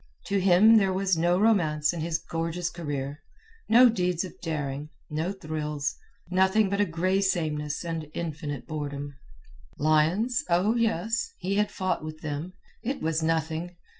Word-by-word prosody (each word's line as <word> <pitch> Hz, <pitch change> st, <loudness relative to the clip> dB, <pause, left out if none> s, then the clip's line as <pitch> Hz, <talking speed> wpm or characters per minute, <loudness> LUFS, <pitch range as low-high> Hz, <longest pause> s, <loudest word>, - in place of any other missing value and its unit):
To 200 Hz, -1 st, +1 dB
him 195 Hz, +4 st, +6 dB
there 195 Hz, -3 st, +3 dB
was 190 Hz, 0 st, +1 dB
no 175 Hz, +2 st, +2 dB
romance 165 Hz, -8 st, +3 dB
in 170 Hz, -, -4 dB
his 165 Hz, 0 st, 0 dB
gorgeous 165 Hz, +1 st, -3 dB
career, 145 Hz, -4 st, -4 dB, 0.5 s
no 245 Hz, +3 st, +8 dB
deeds 180 Hz, -6 st, 0 dB
of 185 Hz, -, -7 dB
daring, 150 Hz, -3 st, -3 dB, 0.2 s
no 160 Hz, +5 st, -1 dB
thrills—nothing 175 Hz, +5 st, -1 dB
but 200 Hz, +1 st, +1 dB
a -, -, +4 dB
gray 185 Hz, +3 st, 0 dB
sameness 155 Hz, -5 st, -1 dB
and 165 Hz, -2 st, -4 dB
infinite 150 Hz, -5 st, -4 dB
boredom. 145 Hz, -1 st, -5 dB, 0.6 s
Lions? 160 Hz, -, +2 dB
Oh, 180 Hz, +6 st, +3 dB
yes! 225 Hz, -1 st, 0 dB
he 185 Hz, +2 st, -2 dB
had 210 Hz, 0 st, +2 dB
fought 185 Hz, -4 st, -2 dB
with 155 Hz, 0 st, -7 dB
them. 155 Hz, +3 st, -4 dB, 0.3 s
It 265 Hz, +4 st, -3 dB
was 160 Hz, 0 st, 0 dB
nothing. 165 Hz, +2 st, -1 dB
170 Hz, 145 wpm, -27 LUFS, 155-190 Hz, 0.6 s, no